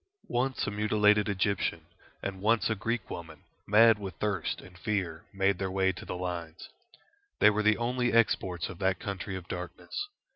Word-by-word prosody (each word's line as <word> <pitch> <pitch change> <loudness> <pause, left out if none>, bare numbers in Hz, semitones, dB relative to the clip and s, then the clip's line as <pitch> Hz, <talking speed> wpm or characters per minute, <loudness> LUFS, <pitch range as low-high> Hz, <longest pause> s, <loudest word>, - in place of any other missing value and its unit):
Once 130 +2 0
a - - -2
mutilated 105 0 +3
Egyptian 95 -4 0 0.4
and 95 -1 -4
once 110 +2 +2
a - - +1
Greek 115 0 -2
woman, 80 -3 -8 0.2
mad 110 +1 +6
with 95 -2 -6
thirst 105 -5 -1
and 90 - -14
fear, 90 -5 -2
made 95 -1 +1
their 95 -1 -1
way 95 0 +2
to 90 - -9
the - - -4
lines. 85 -2 -5 0.7
They - - +6
were 105 +1 0
the 110 0 +4
only 125 +1 0
exports 95 -6 +2
of 90 - -9
that 95 -2 +1
country 100 -2 -4
of 90 -2 -7
darkness. 90 - -5
100 Hz, 175 wpm, -30 LUFS, 90-110 Hz, 0.7 s, mad